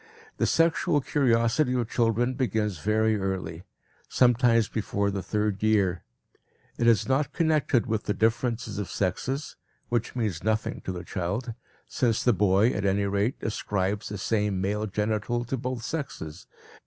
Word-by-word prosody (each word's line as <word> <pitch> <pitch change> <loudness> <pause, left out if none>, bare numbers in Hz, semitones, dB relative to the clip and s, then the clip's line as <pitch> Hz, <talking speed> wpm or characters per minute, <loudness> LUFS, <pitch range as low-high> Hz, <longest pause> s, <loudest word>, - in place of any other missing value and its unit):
The - - +1
sexual 165 -1 +2
curiosity 125 -1 +2
of 120 -3 0
children 120 +1 +1
begins 110 - -1
very 110 +2 +2
early, 95 -3 -4 0.4
sometimes 120 -3 +4
before 100 -2 -1
the 100 -1 -3
third 105 -1 -1
year. 100 -5 +2 0.8
It 120 - +2
is 115 -5 +4
not 135 +2 +1
connected 155 -7 +2
with 110 -3 -2
the 105 - -1
differences 115 0 0
of 100 - -4
sexes, 130 - -2 0.3
which 120 0 -1
means 105 -9 -2
nothing 110 +1 -1
to - - -2
the 90 -1 -6
child, 100 +7 -3 0.3
since 115 -3 0
the 125 - +4
boy, 100 +3 +3
at 100 - -2
any 100 +1 +1
rate, 100 +6 0
ascribes 100 -1 -2
the 105 - -5
same 105 -1 0
male 105 +3 -1
genital 105 +4 -1
to 130 - -2
both 125 -1 -4
sexes. 95 - -5
110 Hz, 150 wpm, -27 LUFS, 100-120 Hz, 0.8 s, sometimes